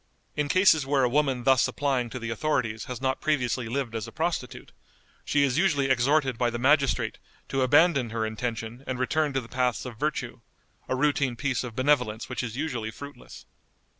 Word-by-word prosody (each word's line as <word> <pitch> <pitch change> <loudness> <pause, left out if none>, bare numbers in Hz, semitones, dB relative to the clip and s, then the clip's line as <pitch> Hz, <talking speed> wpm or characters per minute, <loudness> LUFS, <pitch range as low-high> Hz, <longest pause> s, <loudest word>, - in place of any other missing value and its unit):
In 150 -1 -1
cases 185 -5 +5
where 135 0 +1
a - - +4
woman 135 -2 +1
thus 130 -1 +4
applying 135 -4 -1
to 125 - -6
the 115 -2 -4
authorities 115 -4 -1
has 125 -1 -6
not 130 0 -1
previously 125 -5 0
lived 130 -2 -2
as 115 -2 -4
a - - -9
prostitute, - - -3 0.5
she 145 - +2
is 135 +1 +1
usually 145 -7 +2
exhorted 130 0 +2
by 120 - +2
the 120 - -4
magistrate 135 +2 +2 0.3
to 135 - 0
abandon 140 -1 +4
her 110 0 -2
intention 115 +2 -4
and 130 - -2
return 145 +4 0
to 135 - 0
the 115 - -12
paths 125 0 -1
of 120 -3 -8
virtue, 150 0 -2 0.5
a - - +1
routine 140 -2 +1
piece 135 0 -1
of 120 -3 -7
benevolence 130 -5 +1
which 125 - -3
is 120 -1 -5
usually 125 -7 -3
fruitless. 140 +5 -11
130 Hz, 190 wpm, -27 LUFS, 120-145 Hz, 0.5 s, cases